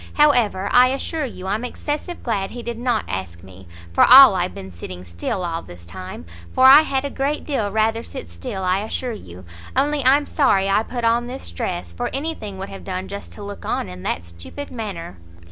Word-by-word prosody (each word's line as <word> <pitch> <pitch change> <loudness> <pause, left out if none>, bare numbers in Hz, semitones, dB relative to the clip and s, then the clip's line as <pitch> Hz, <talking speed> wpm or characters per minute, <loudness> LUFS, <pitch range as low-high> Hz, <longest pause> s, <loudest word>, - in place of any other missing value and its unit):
However, 240 -10 +3
I 250 +1 +7
assure 285 +4 -2
you, 200 -7 -8
I'm 210 +5 -1
excessive 295 +7 -4
glad 200 -5 -1
he 240 -1 -8
did 235 -1 -5
not 240 -3 0
ask 90 -2 -5
me, 95 -1 -14 0.3
for - - +5
all 260 -2 +10
I 185 - 0
have 180 - -3
been 95 0 -8
sitting 90 +1 -9
still 85 - -3
all 165 -1 -3
this 85 -1 -13
time, 90 -1 -9 0.3
for 260 - +5
I 275 +3 +10
had 275 -3 -1
a 280 - -3
great 280 +2 -1
deal 245 -9 -1
rather 220 +2 +1
sit 85 - -8
still, 85 - -6
I 185 +1 +2
assure 230 +4 -3
you; 90 - -10 0.3
only 285 +2 +1
I'm 280 +3 +4
sorry 200 -12 +2
I 195 - +3
put 240 +1 -5
on 235 +1 +2
this 250 - -6
dress, 85 0 -4
for 85 - -3
any 315 +4 -2
thing 205 -9 -8
would 195 +1 -6
have 195 - -9
done 185 0 -4
just 200 0 -7
to 205 - -9
look 200 0 -8
on - - -2
in 90 0 -9
that 85 -1 -3
stupid 85 - -9
manner." 195 - -6
205 Hz, 215 wpm, -21 LUFS, -, 0.3 s, all